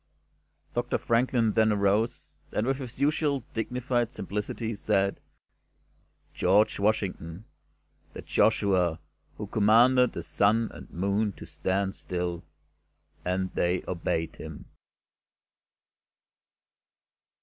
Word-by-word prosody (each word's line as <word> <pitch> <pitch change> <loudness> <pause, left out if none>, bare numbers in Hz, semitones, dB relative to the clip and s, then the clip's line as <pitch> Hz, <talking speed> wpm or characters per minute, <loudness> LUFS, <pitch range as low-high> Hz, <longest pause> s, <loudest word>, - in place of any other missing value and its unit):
Doctor 120 0 0
Franklin 115 -1 +2
then 110 0 +3
arose, 105 +3 0
and, 105 - 0
with 135 +1 +1
his 130 -3 -8
usual 145 -2 +1
dignified 120 +1 -1
simplicity, 105 +3 -4
said: 100 -1 0 1.1
"George 100 +4 +3
Washington' 100 -3 -1 0.7
The - - -8
Joshua 90 -5 +2 0.4
who - - -4
commanded 120 +4 +4
the - - -5
Sun 110 +3 +2
and - - -11
Moon 100 +4 0
to - - -11
stand 95 +1 -1
still, 90 -3 -4 0.8
and 95 +1 -1
they 90 +1 0
obeyed 85 -2 -2
him." - - -9
105 Hz, 95 wpm, -28 LUFS, 95-115 Hz, 1.1 s, commanded